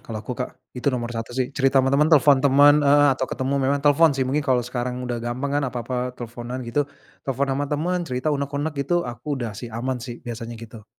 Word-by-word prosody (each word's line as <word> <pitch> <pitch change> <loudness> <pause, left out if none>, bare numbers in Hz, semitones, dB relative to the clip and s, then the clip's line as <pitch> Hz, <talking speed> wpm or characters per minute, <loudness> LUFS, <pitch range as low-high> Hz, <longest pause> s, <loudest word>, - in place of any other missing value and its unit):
kalau 110 -2 -7
aku, 125 - -4
Kak, 125 +1 -5 0.2
itu 125 +2 -1
nomor 120 -2 -2
satu 115 +2 -5
sih. 130 +1 -1
Cerita 135 -1 +1
sama 135 0 +4
temen, 150 +2 +4
telfon 145 -3 +5
temen, 145 +2 +6
eee, 145 0 +5
atau 130 0 -3
ketemu, 130 +2 -2
memang 140 +2 0
telfon 145 0 +5
sih 130 - +1
mungkin 140 +4 0
kalo 130 -4 +1
sekarang 125 0 -3
udah 120 -1 -3
gampang 135 +5 -2
kan - - -3
apa-apa 125 +1 -4
telfonan 120 +2 -6
gitu, 140 +5 -1 0.3
telfon 135 +1 -1
sama 140 +1 -2
temen 175 +5 -1
cerita 130 +4 -1
unek-unek 140 +2 -2
gitu 175 +4 0
aku 130 +4 -4
udah 120 -4 -4
sih 115 +4 -7
aman 125 +3 -3
sih 120 +1 -8
biasanya 115 0 -6
gitu. 110 -1 -11
130 Hz, 220 wpm, -23 LUFS, 120-145 Hz, 0.3 s, temen